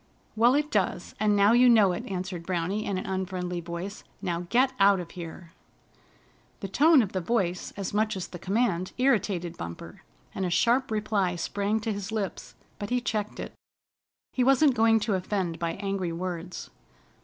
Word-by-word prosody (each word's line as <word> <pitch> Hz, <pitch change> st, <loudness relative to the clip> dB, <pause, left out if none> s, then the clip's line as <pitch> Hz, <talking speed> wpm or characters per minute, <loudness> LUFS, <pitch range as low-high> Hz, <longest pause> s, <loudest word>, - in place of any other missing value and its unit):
"Well, 240 Hz, +4 st, +5 dB
it 300 Hz, +1 st, 0 dB
does, 190 Hz, -3 st, -1 dB
and 210 Hz, -1 st, +3 dB
now 200 Hz, +1 st, +5 dB
you 245 Hz, +1 st, +6 dB
know 215 Hz, -5 st, +6 dB
it," 175 Hz, -, -4 dB
answered 185 Hz, -2 st, -4 dB
Browny 185 Hz, +4 st, -2 dB
in 195 Hz, -, -1 dB
an 185 Hz, -, -4 dB
unfriendly 185 Hz, -2 st, -3 dB
voice. 170 Hz, +4 st, -6 dB, 0.2 s
"Now 175 Hz, -2 st, -3 dB
get 260 Hz, +2 st, +3 dB
out 195 Hz, -1 st, +5 dB
of 170 Hz, -2 st, -7 dB
here!" 170 Hz, -1 st, -9 dB, 1.1 s
The 195 Hz, -, -3 dB
tone 290 Hz, -, +5 dB
of 200 Hz, -, -5 dB
the 185 Hz, -, -2 dB
voice 180 Hz, -3 st, -1 dB
as 195 Hz, -1 st, -4 dB
much 215 Hz, 0 st, +1 dB
as 185 Hz, -, -4 dB
the 175 Hz, -, -9 dB
command 190 Hz, -2 st, 0 dB
irritated 205 Hz, -9 st, +1 dB
Bumper, 85 Hz, 0 st, -8 dB, 0.3 s
and 190 Hz, -, -3 dB
a 180 Hz, -, 0 dB
sharp 235 Hz, +9 st, +2 dB
reply 210 Hz, -4 st, 0 dB
sprang 200 Hz, +5 st, -1 dB
to 220 Hz, 0 st, -2 dB
his 200 Hz, 0 st, -5 dB
lips; 210 Hz, -4 st, -4 dB, 0.2 s
but 205 Hz, -, -4 dB
he 250 Hz, 0 st, +1 dB
checked 215 Hz, -3 st, -3 dB
it. -, -, -6 dB, 0.8 s
He 255 Hz, -, +2 dB
wasn't 270 Hz, +2 st, +5 dB
going 225 Hz, -1 st, +4 dB
to 215 Hz, 0 st, 0 dB
offend 185 Hz, -3 st, -2 dB
by 170 Hz, -1 st, -1 dB
angry 195 Hz, -3 st, -3 dB
words. 175 Hz, 0 st, -5 dB
195 Hz, 180 wpm, -27 LUFS, 180-220 Hz, 1.1 s, you